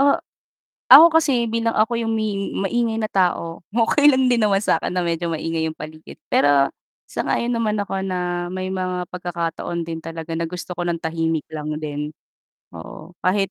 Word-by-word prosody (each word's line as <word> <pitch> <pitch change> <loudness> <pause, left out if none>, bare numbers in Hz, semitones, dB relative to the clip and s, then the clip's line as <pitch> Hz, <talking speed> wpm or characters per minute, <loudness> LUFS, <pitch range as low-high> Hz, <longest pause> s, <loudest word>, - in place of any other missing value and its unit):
Ah, 280 0 +5 0.8
ako 330 - +12
kasi, 260 -6 +1
bilang 230 0 -1
ako 225 +2 +2
'yong 225 -1 -1
may 210 -3 -2
maingay 225 +3 0
na 215 - -1
tao, 175 -3 0
okey 245 +6 +4
lang 260 -1 +3
din 240 -2 +3
naman 200 -2 +3
sa - - +2
'kin - - -3
na 180 - 0
medyo 170 0 -1
maingay 160 0 -2
'yong 160 - -7
paligid. 155 +1 -10 0.2
Pero 140 -1 +4 0.4
sang-ayon 240 +1 -1
naman 220 -3 0
ako 195 -1 -3
na 180 -2 -2
may 185 0 -3
mga 185 -1 -2
pagkakataon 170 -1 -3
din 165 -1 -5
talaga 165 0 -7
na 165 0 -1
gusto 180 +1 -6
ko 175 - -2
ng 170 - 0
tahimik 160 -1 -1
lang 150 0 -4
din, 150 -1 -4 0.6
oo. 85 - -10
Kahit 195 +1 +1
180 Hz, 180 wpm, -21 LUFS, 165-215 Hz, 0.8 s, ako